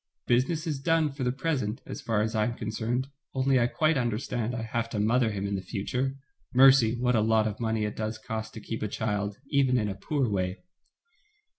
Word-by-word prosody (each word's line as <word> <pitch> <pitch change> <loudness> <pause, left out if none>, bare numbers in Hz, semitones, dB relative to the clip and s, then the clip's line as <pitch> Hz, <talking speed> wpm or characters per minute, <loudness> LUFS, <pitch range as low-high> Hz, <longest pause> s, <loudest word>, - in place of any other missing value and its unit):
"Business 135 +7 +1
is 150 -4 -2
done 160 +1 +2
for 135 -1 -5
the 125 - +1
present, 130 -6 -1
as - - -7
far 110 -3 +1
as 110 +1 -2
I 110 -1 +2
am 120 +1 -2
concerned, 120 +4 -2 0.3
only 130 0 +3
I 120 - +3
quite 155 +2 +2
understand 120 0 -1
I 115 - -3
have 115 0 -2
to 110 - -3
mother 115 +3 +3
him 100 -2 -3
in 100 - -2
the 95 - -1
future 125 +8 -2 0.2
— - - -34
mercy, 130 -3 +6
what 125 0 +2
a 110 - +3
lot 110 0 +3
of 110 0 -5
money 110 -2 0
it 105 - -4
does 110 0 -2
cost 110 0 -5
to 110 - -7
keep 110 +2 -5
a 105 - 0
child, 105 -1 -2
even 135 -3 +3
in 105 -3 +1
a - - -2
poor 130 +7 -1
way." 95 - -2
115 Hz, 225 wpm, -28 LUFS, 110-130 Hz, 0.3 s, mercy